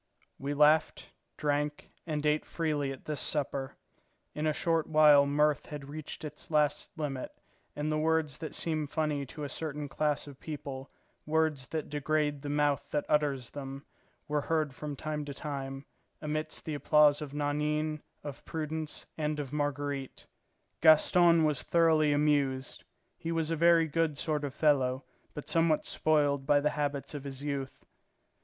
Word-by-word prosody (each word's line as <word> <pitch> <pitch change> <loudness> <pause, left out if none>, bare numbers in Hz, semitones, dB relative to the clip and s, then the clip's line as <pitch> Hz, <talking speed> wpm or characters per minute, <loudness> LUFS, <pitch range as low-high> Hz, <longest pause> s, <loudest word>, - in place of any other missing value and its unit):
We 140 +1 -3
laughed, 150 +2 +3 0.3
drank, 150 0 -1 0.2
and 150 -2 -2
ate 150 0 +2
freely 150 -4 -1
at 135 - -9
this 150 -2 -2
supper. 140 -3 -1 0.6
In 150 +1 -1
a - - +3
short 165 +1 0
while 150 -2 +6
mirth 150 0 +2
had 145 -2 -7
reached 155 +1 -7
its 150 - -7
last 150 -2 +1
limit, 140 -4 -3 0.5
and 150 +1 -2
the 155 - +1
words 160 -3 +1
that 160 - -6
seem 155 -3 -1
funny 150 -2 -1
to 150 +3 -8
a - - -2
certain 150 +1 -4
class 150 +1 -1
of 140 -2 -12
people, 140 -3 -6 0.4
words 155 -4 +1
that 160 -2 -3
degrade 150 0 0
the 145 - -5
mouth 145 -1 +1
that 150 - -1
utters 140 -5 +1
them, 135 0 -7 0.4
were 150 0 0
heard 155 -2 0
from 145 +1 -5
time 150 +1 -3
to 140 -1 -6
time, 135 -2 -5 0.3
amidst 155 0 -3
the 155 - -3
applause 150 0 +4
of 145 -1 -6
Nanine, 150 +1 -1 0.2
of 145 -2 -7
Prudence, 155 -1 -4
and 150 0 -1
of 140 -1 -5
Marguerite. 145 -2 -3 0.6
Gaston 165 +2 +6
was 150 -3 +2
thoroughly 160 -3 +3
amused; 145 -3 +1 0.4
he 165 - -3
was 165 -1 0
a - - +2
very 170 0 +5
good 155 -1 0
sort 150 -1 -1
of 140 - -6
fellow, 135 -3 +2 0.3
but 150 - -7
somewhat 165 -2 +2
spoiled 145 -3 +1
by 145 - +5
the 150 +1 +1
habits 145 -2 -2
of 145 -2 -5
his 135 -1 -7
youth. 140 -2 -4
150 Hz, 160 wpm, -30 LUFS, 145-155 Hz, 0.6 s, while